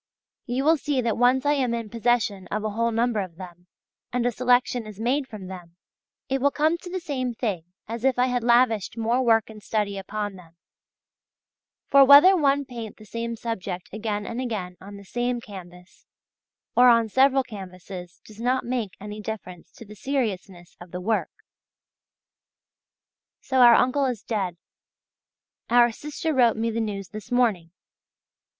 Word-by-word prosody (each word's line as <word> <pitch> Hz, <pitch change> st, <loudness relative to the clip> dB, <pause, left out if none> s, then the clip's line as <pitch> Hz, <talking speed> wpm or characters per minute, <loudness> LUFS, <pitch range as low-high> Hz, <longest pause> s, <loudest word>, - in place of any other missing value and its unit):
You 255 Hz, +2 st, -1 dB
will 320 Hz, +2 st, +4 dB
see 285 Hz, -2 st, -1 dB
that 230 Hz, -2 st, 0 dB
once 250 Hz, +2 st, +3 dB
I 290 Hz, -, +4 dB
am 255 Hz, -5 st, 0 dB
in 230 Hz, -2 st, -4 dB
possession 230 Hz, -5 st, 0 dB
of 215 Hz, +1 st, -3 dB
a 215 Hz, -, -2 dB
whole 230 Hz, +2 st, 0 dB
number 230 Hz, 0 st, 0 dB
of 185 Hz, -4 st, -5 dB
them, 175 Hz, 0 st, -12 dB, 0.4 s
and 245 Hz, -1 st, -1 dB
a 245 Hz, -, +2 dB
selection 245 Hz, -1 st, +1 dB
is 210 Hz, -1 st, -11 dB
made 260 Hz, +4 st, 0 dB
from 210 Hz, -5 st, -9 dB
them, 180 Hz, -2 st, -10 dB, 0.5 s
it 270 Hz, -1 st, -1 dB
will 285 Hz, -, +4 dB
come 310 Hz, +3 st, +1 dB
to 355 Hz, -, -10 dB
the 370 Hz, +1 st, -3 dB
same 260 Hz, -8 st, -3 dB
thing 200 Hz, -9 st, -3 dB, 0.2 s
as 230 Hz, +1 st, -6 dB
if 265 Hz, -2 st, +2 dB
I 250 Hz, -, +4 dB
had 250 Hz, -2 st, -1 dB
lavished 235 Hz, -3 st, +2 dB
more 230 Hz, +3 st, +1 dB
work 225 Hz, -3 st, +3 dB
and 215 Hz, -1 st, -12 dB
study 205 Hz, -2 st, -2 dB
upon 205 Hz, 0 st, -5 dB
them; 170 Hz, -2 st, -17 dB, 1.3 s
for 275 Hz, 0 st, +7 dB
whether 285 Hz, +8 st, +8 dB
one 285 Hz, -4 st, +2 dB
paint 230 Hz, -4 st, -8 dB
the 215 Hz, -, -14 dB
same 230 Hz, +2 st, -4 dB
subject 195 Hz, -6 st, -5 dB
again 210 Hz, -1 st, -3 dB
and 235 Hz, +2 st, -4 dB
again 205 Hz, -8 st, -4 dB
on 200 Hz, +1 st, -10 dB
the 200 Hz, -, -12 dB
same 245 Hz, +3 st, -2 dB
canvas 180 Hz, -4 st, -13 dB, 0.7 s
or 250 Hz, 0 st, +7 dB
on 230 Hz, -1 st, +4 dB
several 270 Hz, +4 st, +3 dB
canvases 185 Hz, -5 st, -10 dB
does 215 Hz, +1 st, -13 dB
not 255 Hz, +2 st, 0 dB
make 235 Hz, -5 st, -2 dB
any 210 Hz, +1 st, -7 dB
difference 195 Hz, -5 st, -7 dB
to 230 Hz, -, -12 dB
the 210 Hz, -, -12 dB
seriousness 200 Hz, -9 st, -4 dB
of 175 Hz, -, -11 dB
the 180 Hz, -, -6 dB
work. 215 Hz, +4 st, -1 dB, 2.1 s
So 260 Hz, -1 st, -1 dB
our 240 Hz, -2 st, +8 dB
uncle 270 Hz, +2 st, +2 dB
is 240 Hz, -5 st, -4 dB
dead! 190 Hz, -6 st, -2 dB, 1.1 s
Our 240 Hz, 0 st, +5 dB
sister 300 Hz, +6 st, -4 dB
wrote 240 Hz, -5 st, +3 dB
me 230 Hz, +1 st, -1 dB
the 230 Hz, +1 st, -2 dB
news 200 Hz, -3 st, -4 dB
this 215 Hz, 0 st, -10 dB
morning. 220 Hz, -9 st, +1 dB
230 Hz, 170 wpm, -25 LUFS, 200-250 Hz, 2.1 s, whether